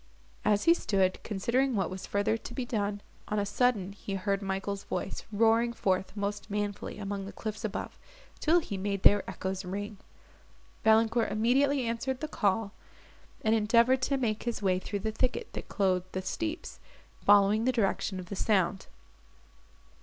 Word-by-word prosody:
As 210 -1 +3
he 335 - +7
stood, 195 - +1
considering 235 +6 0
what 190 -3 0
was 185 0 -6
further 200 +2 +1
to 225 - -7
be 255 - -2
done, 205 -3 -2 0.3
on 210 - -1
a 205 - +1
sudden 205 -2 +1
he 195 0 -6
heard 195 +1 -1
Michael's 195 0 -3
voice - - -4
roaring 225 +2 +3
forth 190 -1 -1
most 205 +1 -3
manfully 205 -1 -3
among 200 -1 -4
the - - -7
cliffs 215 0 -6
above, 210 -2 -4 0.4
till 335 +3 +4
he 200 -10 -5
made 200 0 -2
their 205 0 +7
echoes 190 +1 -4
ring. 200 +2 -5 0.8
Valancourt 225 +1 +4
immediately 260 +4 +2
answered 235 +3 -2
the 310 - -3
call, 205 -5 0 0.7
and 220 - +3
endeavoured 230 +4 +4
to 275 +2 +1
make 220 -5 -1
his 235 -1 -2
way 185 -3 +1
through 200 +1 -4
the 220 - -1
thicket 255 - -2
that - - -7
clothed 185 -2 0
the 185 - -3
steeps, 325 - -4 0.4
following 205 +2 +5
the 255 - +4
direction 200 -4 0
of 180 - -6
the 200 - -6
sound. 190 -2 +1
210 Hz, 165 wpm, -30 LUFS, 195-235 Hz, 0.8 s, he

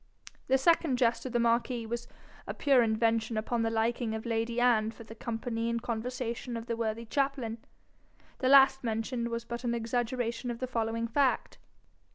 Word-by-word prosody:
The 265 - +4
second 320 -2 +3
jest 235 0 +1
of - - -6
the 240 - +1
marquis 235 0 +1
was 235 +1 -4 0.4
a - - -4
pure 275 -4 +4
invention 225 0 +1
upon 230 +2 -1
the 225 - +1
liking 225 0 0
of 220 - -6
lady 230 +1 -1
Anne 230 -3 +3
for 230 +1 -10
the 225 - -11
company 230 0 -3
and 235 0 0
conversation 235 +1 -4
of 230 - -6
the 235 -1 -2
worthy 230 0 -2
chaplain. 265 -3 -1 0.8
The 260 - +1
last 270 -1 +7
mentioned 235 +1 -2
was 235 0 -4
but 235 +1 -6
an 235 -1 0
exaggeration 235 +1 -2
of 235 - -3
the 255 - -3
following 230 -2 -1
fact. 270 +3 0
235 Hz, 180 wpm, -30 LUFS, 225-250 Hz, 0.8 s, last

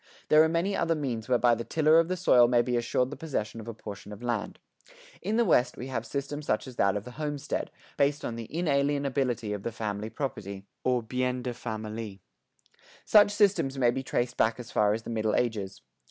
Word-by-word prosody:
There 155 0 +7
are 160 - +4
many 170 +5 0
other 165 0 +1
means 125 -6 -3
whereby 125 -1 +4
the 115 0 -2
tiller 155 +4 +4
of 165 - +2
the 185 +1 -2
soil 125 -9 +5
may 120 0 +3
be 125 0 -1
assured 120 +2 0
the - - -5
possession 115 -8 -4
of 110 - -9
a 115 - -4
portion 105 -1 -9
of 105 +3 -9
land. 120 -1 -2 0.6
In 215 +2 -1
the 235 - +4
West 125 - +3
we 130 - -6
have 115 -3 -3
systems 145 +3 -4
such 110 - 0
as 130 -3 -10
that 100 +1 +3
of 100 - -5
the 125 - -9
homestead, 145 -1 -3 0.3
based 145 0 +1
on 115 - -3
the 115 -1 -6
inalienability 140 -7 0
of 100 - -4
the 115 - -3
family 110 -1 -4
property 100 -8 -5 0.4
(bien 125 0 -1
de 125 - -3
famille). 110 -3 -5 0.9
Such 205 -1 +6
systems 200 -10 +2
may 120 -2 +4
be 130 +2 -3
traced 125 -1 -2
back 110 +2 +2
as 120 -1 -8
far 105 -1 +3
as 110 - -6
the - - -6
Middle 110 -1 0
Ages. 105 -5 -2
125 Hz, 210 wpm, -28 LUFS, 110-145 Hz, 0.9 s, There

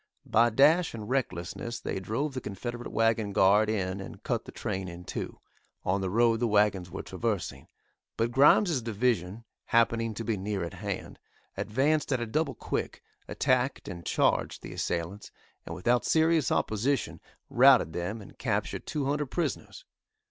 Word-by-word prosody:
By 115 +2 +4
dash 150 +7 +4
and 105 -2 -7
recklessness 120 -2 -3
they - - -3
drove 115 +10 -2
the 130 - -4
Confederate 120 +4 -6
wagon 110 -2 +1
guard 105 +3 +4
in 95 -2 -1
and 95 - -10
cut - - -2
the - - -9
train 95 0 -4
in 85 0 -8
two, - - -6 0.5
on 95 +2 +1
the 95 - -1
road 115 +2 +3
the 120 - +1
wagons 105 -4 +2
were 95 - -6
traversing, 105 +1 -3 0.5
but 115 +1 0
Grimes' 145 - +5
division, 110 -3 -1 0.2
happening 115 -1 +2
to 115 - -4
be 115 -2 -1
near 100 -1 -2
at 85 - -5
hand, - - -5 0.4
advanced 145 +8 0
at 130 - +2
a 120 - -2
double 155 +9 -1
quick, - - -4 0.2
attacked 130 +1 0
and 85 -1 -7
charged - - +1
the - - -7
assailants, 85 +5 -3 0.4
and - - -5
without 120 +6 +1
serious 160 -4 +3
opposition 125 +6 0 0.3
routed 80 - +5
them 100 +5 -4
and - - -16
captured - - -2
two 145 -3 -2
hundred 145 +1 0
prisoners. 175 - -4
115 Hz, 160 wpm, -29 LUFS, 95-130 Hz, 0.5 s, Grimes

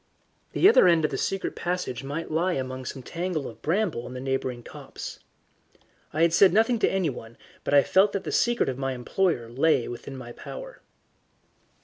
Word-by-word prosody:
The - - +5
other 420 - +7
end 165 -3 +4
of - - -1
the - - -2
secret 195 -1 -2
passage 175 -9 -3
might 145 +5 -5
lie 175 +4 +1
among 130 -2 -4
some 130 +1 -6
tangle 170 -1 -3
of 115 -1 -11
bramble 170 - 0
in 125 - -8
the - - -5
neighbouring 130 -2 -2
copse. - - -9 0.9
I 165 +3 +4
said 180 +3 +6
nothing 225 +3 +3
to - - +3
anyone, 140 -11 -3 0.3
but - - +1
I 140 - +7
felt 195 +2 +4
that 200 - -2
the - - -4
secret 240 0 +2
of 130 0 -3
my 135 -1 -1
employer 125 +1 0
lay 130 +2 +2
within 130 +3 -7
my 120 -2 -8
power. - - -9
155 Hz, 185 wpm, -26 LUFS, 130-185 Hz, 0.9 s, other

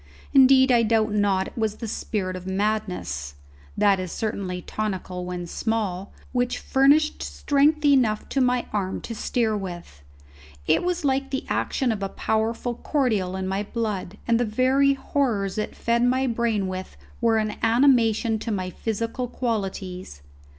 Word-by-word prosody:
Indeed 265 -1 +6
I 240 -1 +5
doubt 220 -1 +2
not 200 -2 +1
it - - -21
was 220 -2 -1
the 230 - -6
spirit 190 -3 -3
of 185 0 -8
madness 190 - -2 0.4
that 200 -2 +4
is 185 -2 -4
certainly 195 -4 -3
tonical 185 -4 -4
when 180 -1 -4
small 200 -1 -2 0.2
which 245 -1 0
furnished 285 +3 +3
strength 295 +1 +1
enough 250 -7 +3
to 275 - 0
my 250 -1 +2
arm 190 -3 -1
to 230 - -6
steer 225 0 0
with. 175 - -7 0.6
It - - +3
was 355 -2 -1
like 270 0 +1
the 270 - -3
action 260 -4 0
of 210 -2 -3
a 195 - -2
powerful 225 +4 -1
cordial 225 -9 0
in 190 0 -3
my 195 +1 -1
blood, 210 -3 -3
and 230 -1 +3
the - - +2
very 260 +5 +3
horrors 225 -8 -1
it 215 - -4
fed 235 +1 +1
my 255 +2 +2
brain 230 -5 0
with 185 0 -6 0.2
were 230 -1 +3
an 215 -1 -1
animation 230 -2 +3
to 225 - -4
my 185 -3 -2
physical 230 +5 -3
qualities. 190 - -4
220 Hz, 155 wpm, -24 LUFS, 190-250 Hz, 0.6 s, Indeed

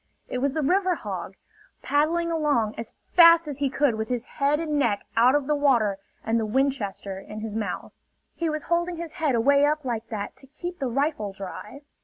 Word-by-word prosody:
It 250 - -3
was 275 +1 0
the 310 -1 -1
river 370 +4 +2
hog, - - -6 0.5
paddling 335 +4 +1
along 290 -9 +1
as 230 -1 -7 0.2
fast 335 -2 +7
as 285 -2 -5
he 280 -1 +1
could 275 -1 +2
with 220 0 -3
his 245 -1 -2
head 290 0 0
and 305 -3 -1
neck 215 -7 0
out 245 +4 +5
of 290 -2 +1
the 300 - +1
water 240 -9 +2 0.3
and 225 +1 +1
the 220 - -1
Winchester 210 -6 -1
in 210 +2 -8
his 220 -1 -5
mouth. 215 -1 -4 0.4
He 335 -1 -2
was 305 -1 -3
holding 345 +1 0
his 335 -1 -6
head 290 -6 +2
away 280 +5 +4
up 300 0 +1
like 230 -2 -3
that 210 -3 -5
to 270 - -14
keep 350 +6 -7
the 270 - -1
rifle 255 -6 -1
dry. 200 +7 -8
275 Hz, 205 wpm, -25 LUFS, 225-305 Hz, 0.5 s, fast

